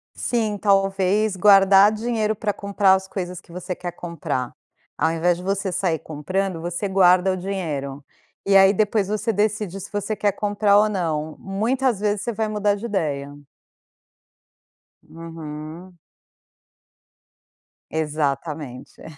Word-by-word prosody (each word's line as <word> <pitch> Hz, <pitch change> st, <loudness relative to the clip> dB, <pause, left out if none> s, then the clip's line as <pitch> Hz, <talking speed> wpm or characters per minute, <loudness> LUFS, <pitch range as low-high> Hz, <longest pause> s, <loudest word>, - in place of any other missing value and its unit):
Sim, 220 Hz, -4 st, -1 dB
talvez 195 Hz, +1 st, +2 dB
guardar 195 Hz, +1 st, +6 dB
dinheiro 220 Hz, -1 st, -1 dB
para 205 Hz, 0 st, -2 dB
comprar 200 Hz, -1 st, +2 dB
as 190 Hz, 0 st, 0 dB
coisas 180 Hz, -2 st, -5 dB
que 170 Hz, -, -20 dB
você 180 Hz, +1 st, -5 dB
quer 175 Hz, -1 st, -5 dB
comprar. 150 Hz, -7 st, -4 dB, 0.4 s
Ao 160 Hz, +2 st, +1 dB
invés 170 Hz, +1 st, +1 dB
de 180 Hz, -, -9 dB
você 195 Hz, 0 st, -1 dB
sair 175 Hz, -3 st, 0 dB
comprando, 170 Hz, +3 st, -3 dB
você 175 Hz, +4 st, -3 dB
guarda 185 Hz, 0 st, +4 dB
o -, -, -3 dB
dinheiro. 150 Hz, -8 st, -4 dB, 0.4 s
E 195 Hz, 0 st, +3 dB
aí 195 Hz, +1 st, +7 dB
depois 205 Hz, -1 st, +1 dB
você 215 Hz, +2 st, -1 dB
decide 205 Hz, -2 st, -1 dB
se 195 Hz, -, -10 dB
você 205 Hz, +1 st, -2 dB
quer 205 Hz, -2 st, 0 dB
comprar 205 Hz, 0 st, +2 dB
ou 215 Hz, +1 st, +5 dB
não. 160 Hz, -6 st, -2 dB
Muitas 230 Hz, +4 st, 0 dB
vezes 205 Hz, -1 st, 0 dB
você 235 Hz, -, -2 dB
vai 220 Hz, 0 st, -2 dB
mudar 210 Hz, -1 st, +1 dB
de 210 Hz, +4 st, -7 dB
ideia. 145 Hz, -9 st, -2 dB, 1.7 s
Uhum. 165 Hz, +2 st, -9 dB, 1.9 s
Exatamente. 150 Hz, -3 st, -3 dB
195 Hz, 130 wpm, -22 LUFS, 165-205 Hz, 1.9 s, aí